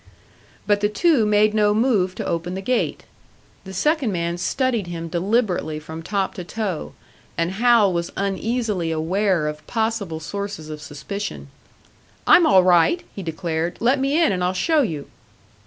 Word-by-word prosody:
But 205 -1 +2
the 205 - +2
two 245 0 +3
made 210 0 +3
no 210 -1 +3
move 210 -6 +2
to - - -4
open 170 +2 -2
the 190 - -4
gate. 250 +4 -1 0.6
The 190 - -8
second 295 - +1
man 170 -1 -2
studied 235 -1 0
him 165 -1 -5
deliberately 180 -2 0
from 160 +1 -8
top 195 +3 -2
to 180 - -6
toe, 190 -3 -4 0.4
and 170 +1 0
Hal 220 -1 +4
was 170 0 -2
uneasily 200 -2 -1
aware 170 +1 0
of 150 0 -6
possible 220 -8 -2
sources 200 -1 -5
of 150 -1 -7
suspicion. 180 +8 -6 0.8
"I'm 340 - +6
all 190 -11 +6
right," 180 - +4
he 200 - -5
declared. 165 0 -3
"Let 255 +4 +2
me 275 +4 +1
in, 330 - +4
and 180 -2 -1
I'll 180 +1 +1
show 310 - +2
you." 160 - -3
195 Hz, 160 wpm, -22 LUFS, 170-225 Hz, 0.8 s, I'm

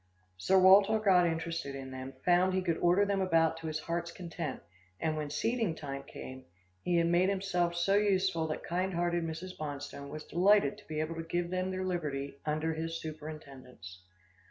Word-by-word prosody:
Sir 140 - +2
Walter 195 +3 +7
got 190 -5 +4
interested 165 -3 -3
in 135 -1 -7
them, 130 +1 -7
found 180 +1 +4
he 190 - 0
could 170 -3 0
order 180 +4 +4
them 200 -1 0
about 165 -3 +2
to 165 0 -6
his 155 0 -3
heart's 170 0 -3
content, 170 -5 -5 0.4
and 155 -1 0
when 150 -1 -3
seeding 220 +4 0
time 140 -3 -6
came, 130 -1 -10 0.4
he 175 - 0
had 170 0 +3
made 175 +3 +3
himself 180 -3 0
so 175 +3 +1
useful 190 -5 +2
that 155 - -4
kind 185 +2 -1
hearted 175 0 0
Mrs. 165 +3 -5
Bonstone 145 -1 -6
was 155 +1 -7
delighted 185 -3 +3
to - - -19
be 155 -1 -3
able 155 +1 -2
to - - -2
give 175 +1 -2
them 185 0 -1
their 185 0 -3
liberty, 140 -6 -3
under 155 +2 0
his 165 +1 -4
superintendence. 140 - -9
165 Hz, 185 wpm, -31 LUFS, 155-185 Hz, 0.4 s, Walter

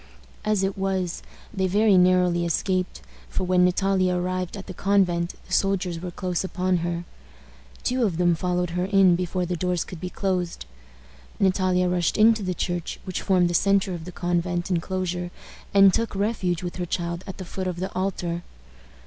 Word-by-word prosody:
As 210 -2 +1
it 195 0 -1
was, 190 -2 -1 0.3
they 190 -2 0
very 205 +2 +4
narrowly 180 -1 +4
escaped, 185 +2 -1 0.3
for - - -2
when 180 0 +3
Natalia 185 0 +2
arrived 180 +1 -2
at 195 - -8
the 185 - -7
convent 180 -3 +1
the - - -8
soldiers 185 -3 +1
were 180 - -4
close 180 0 -2
upon 185 -1 0
her. 170 0 -2 0.8
Two 255 0 +1
of 190 -7 0
them 175 -1 +3
followed 180 +1 -1
her 180 +1 -1
in 190 -2 +5
before 180 0 -1
the 180 +1 -2
doors 180 0 0
could 180 -4 -10
be 180 - -3
closed. 180 - -2 0.7
Natalia 185 -1 +2
rushed 180 -2 +1
into 220 0 +5
the 185 -2 -2
church, 175 0 -3
which 185 - -4
formed 185 -3 +3
the 175 - -2
centre 195 +1 +2
of 165 -2 -6
the 180 - -7
convent 175 +1 -1
inclosure, 180 0 -2 0.4
and 195 -1 +6
took 230 -2 -1
refuge 195 -4 -1
with 175 0 -5
her 180 -1 -3
child 170 +1 -3
at 190 - -7
the 185 - -7
foot 185 +1 -4
of 180 - -2
the 190 +1 -4
altar. 180 -2 -2
180 Hz, 180 wpm, -25 LUFS, 175-190 Hz, 0.8 s, and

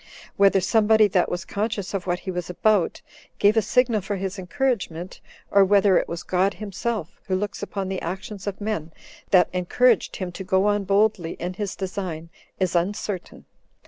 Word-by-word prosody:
Whether 195 -1 +4
somebody 220 +2 +4
3 - - +6
that 180 -2 +2
was 175 -1 -3
conscious 205 -1 -3
of 190 -2 -3
what 180 0 -1
he 190 - -4
was 180 -1 -4
about, 195 0 +1 0.3
gave 205 +2 +4
a 225 - +4
signal 235 -1 +2
for 200 +2 -3
his 195 0 -4
encouragement, 185 - -2 0.3
or 200 0 +6
whether 200 0 +4
it - - -3
was 170 -1 -5
God 190 +2 +1
himself, 205 -1 -4
who 190 - +1
looks 205 +2 -3
upon 200 -1 -4
the 190 -1 -3
actions 190 +3 -6
of 200 - -3
men, 205 -7 -3 0.4
that 180 -2 +5
encouraged 215 +6 +2
him 185 -2 -4
to 190 - -7
go 190 0 +2
on 205 -1 +1
boldly 200 -4 +2
in 180 +2 -5
his 200 +1 -4
design, 185 -4 -5 0.3
is 185 -2 0
uncertain. 185 +1 -2
195 Hz, 180 wpm, -24 LUFS, 180-210 Hz, 0.4 s, 3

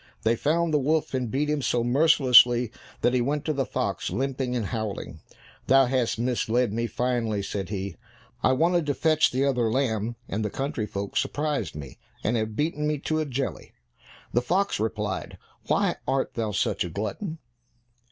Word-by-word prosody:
They 115 +2 +3
found 160 +5 +1
the 150 - +4
wolf, 155 +3 0
and 125 -3 -1
beat 140 +5 0
him 150 -1 0
so 120 -2 +1
mercilessly, 125 -3 +5 0.3
that 120 - +3
he 125 - +2
went 145 +4 -1
to 155 - 0
the 135 -3 -1
fox 100 -6 -2
limping 130 -1 -2
and 115 -4 -1
howling. 105 -6 -4 0.5
"Thou 135 +1 +6
hast 125 -2 0
misled 120 -1 0
me 115 +1 -1
finely," 115 -5 -1
said 95 -1 -4
he; 100 -3 -4 0.4
"I 130 - +4
wanted 170 +3 +2
to 145 - 0
fetch 155 -1 +3
the 130 +2 0
other 125 -5 +1
lamb, 115 -3 0
and 110 +3 -2
the 105 - -1
country 135 -3 -3
folks 100 +4 -2
surprised 135 - -2
me, 70 -3 -9 0.2
and 115 - +1
have 110 -1 -2
beaten 150 +2 -1
me 150 0 0
to 155 +2 -1
a 155 - 0
jelly." 135 -1 -4 0.6
The 120 - +3
fox 190 - 0
replied, 105 -2 -3 0.3
"Why - - +1
art 135 0 0
thou 110 -2 -2
such - - 0
a 90 - -4
glutton?" 110 - -4
125 Hz, 180 wpm, -26 LUFS, 110-145 Hz, 0.6 s, Thou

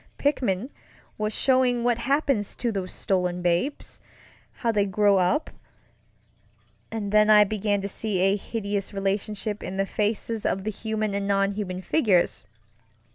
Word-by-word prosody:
Pickman 250 -5 0 0.4
was 215 0 -2
showing 255 0 +2
what 240 -1 +1
happens 275 -4 0
to 240 - -1
those 190 -3 -4
stolen 180 -2 -1
babesŌĆöhow 230 +3 -3
they 205 -1 +2
grow 200 0 +3 1.7
upŌĆöand 210 -3 -4
then 210 0 +5
I 210 -1 +8
began 205 0 -1
to 200 - -3
see 205 0 -2
a 195 +1 +3
hideous 200 -1 -4
relationship 205 +2 -2
in 190 - -5
the 195 - +1
faces 215 +2 -2
of 190 - -1
the 215 - -2
human 215 -1 -3
and 200 0 -2
non 195 0 +2
human 190 -3 -4
figures. 195 - +2
205 Hz, 135 wpm, -25 LUFS, 195-225 Hz, 1.7 s, I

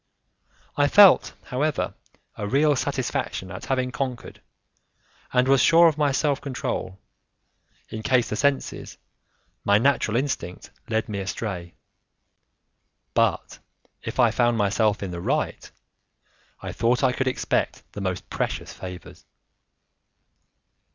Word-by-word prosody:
I 145 0 +4
felt, 200 +3 +6
however, 145 +4 -1 0.4
a 105 - -4
real 145 +5 +3
satisfaction - - -3
at - - -7
having 130 -1 0
conquered, 125 -2 -5 0.9
and 125 0 +2
was 135 -1 +5
sure 170 +3 +6
of 160 - +2
my 145 -2 +1
self 140 +1 0
control, 125 -8 -4 0.9
in 110 - -6
case 120 +2 +2
the - - -3
senses, 140 +3 -1 0.7
my 100 0 +4
natural 120 -2 +2
instinct, 130 -10 -3 0.2
led 110 -1 0
me 105 -2 -4
astray. 95 -3 -5 1.4
But - - 0 0.4
if - - -6
I - - +5
found 120 -1 +2
myself 105 0 +1
in 95 - -4
the 85 -1 -5
right, - - -2 0.9
I - - -5
thought 120 +4 +1
I 130 - +4
could 130 +1 -1
expect 130 - -1
the 100 - -7
most 95 -1 -3
precious - - -3
favours. 90 -1 -10
125 Hz, 125 wpm, -24 LUFS, 105-140 Hz, 1.4 s, felt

